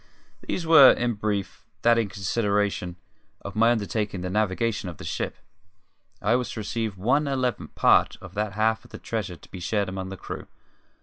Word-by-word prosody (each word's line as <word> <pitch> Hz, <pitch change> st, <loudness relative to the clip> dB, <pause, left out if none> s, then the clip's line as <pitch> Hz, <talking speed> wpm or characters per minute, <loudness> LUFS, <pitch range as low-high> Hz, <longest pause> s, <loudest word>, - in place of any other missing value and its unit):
These 175 Hz, -, -3 dB
were, 160 Hz, -5 st, +9 dB
in 120 Hz, -1 st, 0 dB
brief, 105 Hz, -2 st, -3 dB, 0.2 s
that 115 Hz, 0 st, +5 dB
in 110 Hz, -3 st, -1 dB
consideration 100 Hz, -2 st, -1 dB, 0.5 s
of 100 Hz, -, -8 dB
my 115 Hz, +2 st, +5 dB
undertaking 105 Hz, -4 st, -1 dB
the 90 Hz, 0 st, -3 dB
navigation 105 Hz, 0 st, 0 dB
of 85 Hz, -, -9 dB
the -, -, -10 dB
ship, -, -, -3 dB, 0.9 s
I 110 Hz, +4 st, +3 dB
was 125 Hz, 0 st, -1 dB
to -, -, -5 dB
receive 110 Hz, -1 st, -3 dB
one 130 Hz, +10 st, +2 dB
eleventh 130 Hz, -5 st, -2 dB
part -, -, +4 dB
of 95 Hz, -1 st, -11 dB
that 105 Hz, 0 st, -2 dB
half 110 Hz, +2 st, +1 dB
of 120 Hz, -, -17 dB
the -, -, -8 dB
treasure 105 Hz, -6 st, -4 dB
to -, -, -18 dB
be 95 Hz, -, -7 dB
shared 100 Hz, +2 st, -1 dB
among 95 Hz, 0 st, -5 dB
the 95 Hz, -, -7 dB
crew. -, -, -7 dB
105 Hz, 185 wpm, -25 LUFS, 95-115 Hz, 0.9 s, were